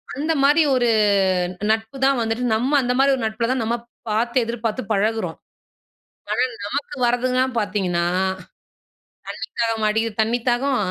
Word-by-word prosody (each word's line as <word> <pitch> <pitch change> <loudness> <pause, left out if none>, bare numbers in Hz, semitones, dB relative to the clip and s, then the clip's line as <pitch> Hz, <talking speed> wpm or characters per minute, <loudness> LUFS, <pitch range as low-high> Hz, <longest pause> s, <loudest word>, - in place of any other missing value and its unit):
அந்த 310 +3 0
மாதிரி 295 +4 +5
ஒரு 245 -2 +2 0.8
நட்பு 225 +4 -2
தான் 275 -1 +3
வந்துட்டு, 225 +2 -1
நம்ம 250 +5 0
அந்த 250 -1 0
மாதிரி 275 +1 +4
ஒரு 260 - -5
நட்பில 220 +1 -1
தான் 260 -1 0
நம்ம 230 +2 0 0.3
பார்த்து 235 +4 +1
எதிர்பார்த்து 230 +1 -3
பழகுறோம். 205 -4 -1 0.9
ஆனா - - +1 0.2
நமக்கு 280 +7 -4
வரதுங்களா 255 +2 +1
பார்த்தீங்கன்னா, 195 -5 0 0.5
தண்ணி - - -56 1.0
தாகமா 225 -2 +1
அடிக்குது 225 0 -1
தண்ணி 230 +3 +1
தாகம். 260 +2 +1
235 Hz, 140 wpm, -21 LUFS, 220-255 Hz, 1.0 s, மாதிரி